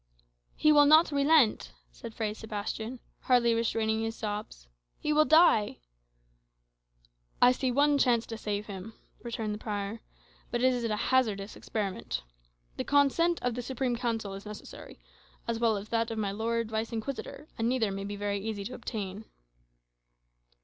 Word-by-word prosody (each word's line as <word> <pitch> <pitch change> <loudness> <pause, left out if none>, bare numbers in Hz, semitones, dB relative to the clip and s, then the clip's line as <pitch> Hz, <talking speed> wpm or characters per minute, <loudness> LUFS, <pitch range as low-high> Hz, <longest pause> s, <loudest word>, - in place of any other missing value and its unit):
"He 305 - +4
will 290 -1 +7
not 310 +2 +6
relent," 285 -4 +3 0.2
said 230 -1 -10
Fray 215 -2 -2
Sebastian, 220 +2 -5 0.2
hardly 240 -2 +3
restraining 225 -1 0
his 225 0 -3
sobs. 205 - -5 0.3
"He 300 - -1
will 305 +1 +5
die." 315 -11 +5 1.6
"I 245 - +7
see 255 +1 -1
one 285 +3 +3
chance 235 -4 +3
to 225 - -6
save 210 -1 -3
him," 200 +2 -8 0.3
returned 225 -3 -3
the 210 - -6
prior; 210 +1 -4 0.5
"but 240 +1 -1
it 255 0 +5
is 245 -1 -2
a 215 -2 0
hazardous 215 -4 0
experiment. 200 -4 -4 0.5
The - - -1
consent 290 +5 +3
of 245 -1 0
the 245 - -4
Supreme 255 0 -2
Council 230 -4 -2
is 195 +1 -8
necessary, 210 - -10 0.5
as 230 -1 -1
well 225 -3 +2
as 200 +1 -8
that 230 0 0
of 225 - -4
my 205 -2 -1
Lord 225 +2 -2
Vice 220 +1 -2
Inquisitor, 265 +5 -5
and 225 +1 +1
neither 235 -5 +1
may 195 0 -4
be 205 +1 -5
very 205 0 -2
easy 205 0 -4
to 250 - -5
obtain." 205 -1 -5
225 Hz, 160 wpm, -29 LUFS, 210-250 Hz, 1.6 s, will